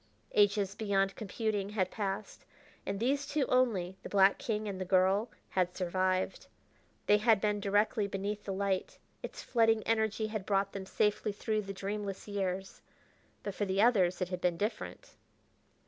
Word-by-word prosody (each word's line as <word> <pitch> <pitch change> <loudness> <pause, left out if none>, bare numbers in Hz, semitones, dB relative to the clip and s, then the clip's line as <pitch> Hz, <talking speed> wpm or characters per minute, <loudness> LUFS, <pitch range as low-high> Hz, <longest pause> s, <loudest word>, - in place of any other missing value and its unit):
Ages 205 -1 +3
beyond 195 -2 0
computing 210 -1 -2
had 190 -3 -1
passed, 200 -1 -4 0.4
and 195 0 -2
these 275 +5 0
two 285 -2 +1
only, 205 -9 +1
the - - -8
black 195 0 +5
king 215 -2 -2
and 190 -2 -4
the - - +1
girl, 190 +4 +3 0.2
had 180 -1 0
survived. 185 +1 0 0.6
They 210 - +5
had 220 -1 +4
been 210 0 0
directly 205 +1 +1
beneath 200 +1 -3
the 200 - -4
light; 195 -1 -1 0.2
its - - -7
flooding 225 -2 +3
energy 220 -1 +1
had 215 -2 -3
brought 195 0 +1
them 190 -1 -6
safely 210 +1 +1
through 215 +1 -1
the 195 -1 -6
dreamless 200 0 -4
years. 195 -2 -3 0.6
But, 200 - -3
for 205 - -1
the 190 0 -1
others, 190 -7 +3
it 180 - 0
had 180 -1 -4
been 175 -2 +1
different. 210 +5 -4
200 Hz, 165 wpm, -32 LUFS, 190-215 Hz, 0.6 s, black